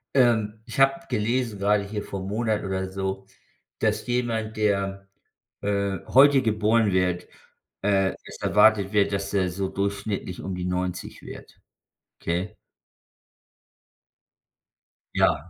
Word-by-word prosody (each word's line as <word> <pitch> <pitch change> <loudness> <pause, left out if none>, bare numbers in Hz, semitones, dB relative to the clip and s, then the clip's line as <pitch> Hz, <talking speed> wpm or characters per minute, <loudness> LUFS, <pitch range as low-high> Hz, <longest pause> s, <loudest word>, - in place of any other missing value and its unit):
Ähm, 110 -4 +3
ich 115 - -6
habe 135 +5 +3
gelesen, 115 -1 -1
gerade 100 +1 +2
hier 105 +1 -4
vor 100 -1 -6
'm 95 - -5
Monat 110 0 0
oder 95 -1 -2
so, 95 0 -4 0.5
dass - - 0
jemand, 115 -3 -1
der, 100 -2 -1 0.5
äh, 100 -2 -1
heute 140 +1 +6
geboren 110 -1 +2
wird 90 -1 0 0.5
äh, 95 -1 +2
es - - -10
erwartet 105 -3 +4
wird, 105 -1 +2
dass 100 0 -2
er 95 -2 +2
so 95 +2 -3
durchschnittlich 100 -1 -3
um 95 - -4
die 90 0 -4
90 90 0 -3
wird. - - -11 0.6
Okay? 85 +4 -2 2.6
Ja. 80 +1 +2
100 Hz, 125 wpm, -25 LUFS, 95-110 Hz, 2.6 s, heute